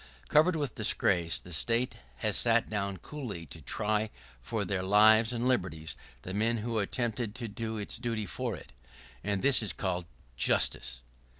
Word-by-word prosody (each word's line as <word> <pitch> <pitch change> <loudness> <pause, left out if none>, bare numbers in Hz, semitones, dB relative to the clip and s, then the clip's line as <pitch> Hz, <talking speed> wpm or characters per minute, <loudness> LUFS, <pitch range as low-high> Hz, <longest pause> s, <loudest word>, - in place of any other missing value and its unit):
[¶41] - - -24
Covered 160 +4 +5
with 145 -6 -2
disgrace, 90 -5 +2
the 90 - -10
State 115 +10 +1 0.2
has 65 - 0
sat - - +4
down 100 -2 -2
coolly 115 - -6
to 65 - -11
try 110 0 0 0.3
for 105 - -2
their 95 0 -1
lives 110 +4 +6
and 120 +1 -1
liberties 80 - -1 0.3
the 95 - -6
men 115 +3 +1
who 115 0 -1
attempted 115 +1 -2
to 120 -3 -4
do 110 +1 -4
its 105 +2 -4
duty 115 -3 -2
for 80 - -3
it. - - -12 0.5
And 100 -2 -1
this 140 -3 +6
is 105 -6 -2
called 90 -3 -2 0.3
justice! - - +1
105 Hz, 170 wpm, -30 LUFS, 95-115 Hz, 0.5 s, lives